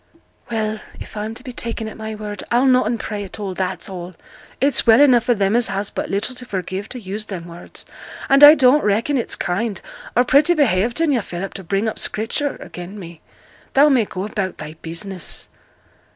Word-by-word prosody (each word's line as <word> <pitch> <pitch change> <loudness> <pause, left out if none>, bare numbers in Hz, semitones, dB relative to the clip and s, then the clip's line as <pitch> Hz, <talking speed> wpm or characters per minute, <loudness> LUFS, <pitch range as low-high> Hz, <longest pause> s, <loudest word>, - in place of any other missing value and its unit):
'Well, 220 -2 -1 0.2
if - - -10
I'm 215 +1 -4
to - - -8
be 260 - -7
taken 230 -2 -4
at 220 - -8
my 220 0 -6
word, 210 -2 -6
I'll 245 +3 +3
noane 255 -2 +3
pray 210 -2 -4
at 195 +2 -9
all, 195 -2 -3
that's 185 +3 -3
all. 180 -2 -7 0.4
It's 275 -3 +2
well 225 0 +7
enough 250 -5 +5
for 245 - +3
them 200 +1 +1
as 240 -1 +3
has 195 +1 -3
but - - -4
little 200 +6 -1
to 250 - -8
forgive 190 -2 -4
to 255 - -6
use 210 0 -5
them 185 -5 -6
words; 170 0 -10 0.4
and 275 +1 +5
I 295 +2 +12
don't 270 +1 +4
reckon 220 +8 +1
it's 245 - 0
kind, 200 +2 -2 0.4
or 245 - +5
pretty 290 +7 +4
behaved 240 - +2
in 325 -3 +3
yo', 250 -4 +2
Philip, 190 0 -6
to 195 - -8
bring 195 +5 0
up 220 - -3
Scripture 240 +7 -1
again' 180 +3 -8
me. 170 -4 -10 0.5
Thou 285 +2 +7
may 255 -6 +3
go 185 -1 -5
about 195 -3 -3
thy 155 - -7
business.' 170 +2 -4
215 Hz, 205 wpm, -20 LUFS, 195-245 Hz, 0.5 s, I